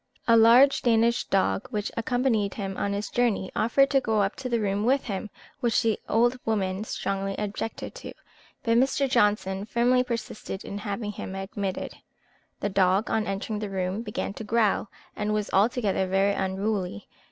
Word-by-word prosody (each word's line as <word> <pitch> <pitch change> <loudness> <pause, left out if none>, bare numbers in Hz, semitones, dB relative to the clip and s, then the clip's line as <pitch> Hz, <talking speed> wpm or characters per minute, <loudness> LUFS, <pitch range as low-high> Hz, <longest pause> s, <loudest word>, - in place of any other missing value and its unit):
A 230 - +6
large 240 +5 +6
Danish 235 0 +2
dog, 195 +4 0
which 210 -4 -3
accompanied 230 -3 0
him 195 -2 -4
on 200 - -1
his 200 +1 -4
journey, 230 -6 0
offered 270 +5 +3
to 270 -1 +4
go 220 -4 +1
up 195 - -1
to 260 -1 -5
the 235 -1 +1
room 205 -1 0
with 265 +4 +2
him, 205 -1 -4 0.3
which 240 -5 +1
the 225 -2 +1
old 240 +3 +2
woman 195 -3 -1
strongly 195 -2 -3
objected 210 +2 -4
to, - - -9 0.5
but 230 -1 +3
Mr. 270 +1 +2
Johnson 205 -5 +1
firmly 245 +3 +2
persisted 230 -5 -5
in 200 - -5
having 205 +1 -4
him 190 -2 -7
admitted. 195 0 -4 0.6
The 205 - 0
dog, 190 +2 +2
on 220 -1 0
entering 200 +2 -3
the 210 -1 -4
room, 190 +2 -2
began 210 -3 -4
to 220 - -7
growl, 215 -1 +1 0.3
and 210 0 -1
was 210 -1 -2
altogether 205 -2 +2
very 195 +2 +2
unruly. 190 - -2
210 Hz, 170 wpm, -26 LUFS, 195-235 Hz, 0.6 s, A